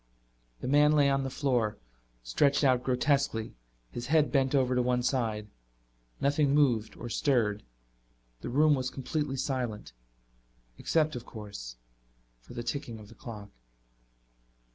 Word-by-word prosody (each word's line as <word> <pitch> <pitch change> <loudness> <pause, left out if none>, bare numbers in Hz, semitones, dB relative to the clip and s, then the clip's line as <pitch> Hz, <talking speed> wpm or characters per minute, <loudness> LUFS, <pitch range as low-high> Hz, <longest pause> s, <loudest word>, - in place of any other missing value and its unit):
The - - -4
man 145 +2 +5
lay 145 -2 +4
on 135 0 +2
the 135 - -2
floor, 125 -6 0 0.5
stretched 140 - +2
out 130 -2 +3
grotesquely, 130 -3 +1 0.4
his 120 - -5
head 150 +1 +3
bent 135 -1 +2
over 130 -2 +3
to 125 - +2
one 125 0 +1
side. 110 -5 -1 0.7
Nothing 145 0 +2
moved 120 -7 +2
or 120 - -6
stirred. 115 -5 +1 0.8
The - - -6
room 150 +4 +4
was 130 -2 0
completely 135 +1 -3
silent, 125 - -3 0.9
except, 155 -2 +1
of 120 - -7
course, 100 - -8 0.6
for - - -14
the 120 - -4
ticking 120 -3 -4
of 105 -1 -12
the - - -13
clock. 105 -4 -9
130 Hz, 140 wpm, -30 LUFS, 115-140 Hz, 0.9 s, man